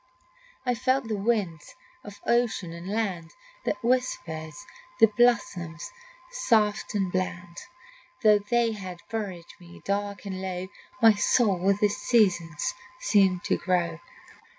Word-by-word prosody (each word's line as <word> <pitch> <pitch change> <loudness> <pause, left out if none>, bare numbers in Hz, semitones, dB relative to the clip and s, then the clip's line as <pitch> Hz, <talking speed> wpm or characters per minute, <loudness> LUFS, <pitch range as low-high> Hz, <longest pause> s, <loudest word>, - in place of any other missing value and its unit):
I 250 - +2
felt 255 +1 0
the 220 - -1
winds 195 -7 -1 0.3
of 205 0 -11
ocean 235 -8 +1
and 170 +2 -8
land 190 -6 -2 0.3
That - - -2
whispered 175 -11 -1 0.5
the - - +9
blossoms 205 -6 +1 0.4
soft 220 - +1
and 195 -3 0
bland. 175 -2 -3 0.6
Though 210 -1 +6
they 230 +3 +1
had 185 -5 -8
buried 195 -6 -5
me 175 -1 -14
dark 200 +1 -2
and 190 -1 -5
low, 185 0 -4 0.3
My 225 -1 +9
soul 205 -2 +2
with 195 +2 +1
the 210 - +4
season's 205 - +1 0.3
seemed 195 - +3
to - - +1
grow. 170 -3 0
200 Hz, 130 wpm, -27 LUFS, 175-225 Hz, 0.6 s, the